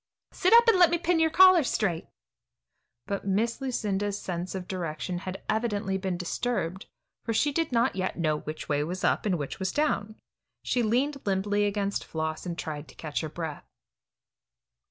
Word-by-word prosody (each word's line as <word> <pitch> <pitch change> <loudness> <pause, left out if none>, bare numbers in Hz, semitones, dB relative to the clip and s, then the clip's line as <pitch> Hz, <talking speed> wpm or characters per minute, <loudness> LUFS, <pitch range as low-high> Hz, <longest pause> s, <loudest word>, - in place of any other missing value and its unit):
Sit 370 - +1
up 470 +1 +8
and 450 -5 +5
let 350 -3 +7
me 345 - +1
pin 340 0 +1
your 320 0 +4
collar 370 +1 +7
straight." 195 - -1 1.0
But 200 0 -4
Miss 230 +6 0
Lucinda's 205 -6 -1
sense 180 +1 -4
of 185 -1 -5
direction 175 -1 -3
had 185 +1 -7
evidently 210 -3 0
been 190 -2 -2
disturbed, 185 0 -2 0.4
for 225 - -2
she 290 +6 +2
did 325 +1 -1
not 235 +1 +2
yet 185 0 -2
know 155 -3 +1
which 155 +1 -7
was 150 +5 -1
up, - - +2
and 185 -3 +1
which 145 +3 -5
was 190 -1 -1
down. 220 -8 0 0.5
She 245 - +1
leaned 260 +6 +1
limply 205 +1 +1
against 200 0 -1
Floss 160 +2 -4
and 170 -1 -4
tried 150 -2 -5
to - - -15
get 150 -3 -3
her 155 - -4
breath. 160 -2 -6
200 Hz, 175 wpm, -28 LUFS, 175-245 Hz, 1.0 s, up